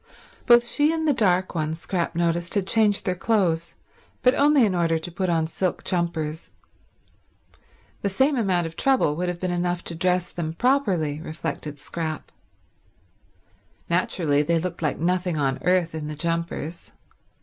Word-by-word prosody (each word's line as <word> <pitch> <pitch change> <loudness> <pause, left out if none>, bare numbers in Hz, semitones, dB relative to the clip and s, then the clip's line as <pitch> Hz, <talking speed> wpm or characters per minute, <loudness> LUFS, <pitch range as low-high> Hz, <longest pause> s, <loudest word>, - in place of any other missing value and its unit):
Both 240 0 +7
she 290 +5 +2
and 320 -1 -1
the 295 - +4
dark 185 -6 +2
one, 155 -2 -1
Scrap 170 +1 -3
noticed, 170 +1 0
had 200 -2 +1
changed 210 -1 +2
their 185 - +1
clothes, 180 -4 0 0.5
but 250 - +5
only 285 -3 +4
in 200 - 0
order 165 -2 +1
to 160 +2 -5
put 185 +1 -2
on 165 -2 +2
silk 180 +3 -2
jumpers. 165 -3 -2 1.5
The 200 - 0
same 265 +9 +2
amount 190 -8 +1
of 165 0 -7
trouble 260 - +2
would 180 +2 -2
have 175 -1 -4
been 185 0 -2
enough 175 0 -1
to - - -5
dress 180 +1 0
them 160 -2 -4
properly, 180 - +1
reflected 155 -2 -5
Scrap. 155 +1 -5 1.6
Naturally 165 -4 +1
they 165 +3 +1
looked 175 +1 -4
like 150 - 0
nothing 180 0 0
on 135 -2 0
earth 180 -2 +2
in 155 -2 -4
the 150 - -5
jumpers. 165 0 -3
175 Hz, 160 wpm, -24 LUFS, 160-190 Hz, 1.6 s, Both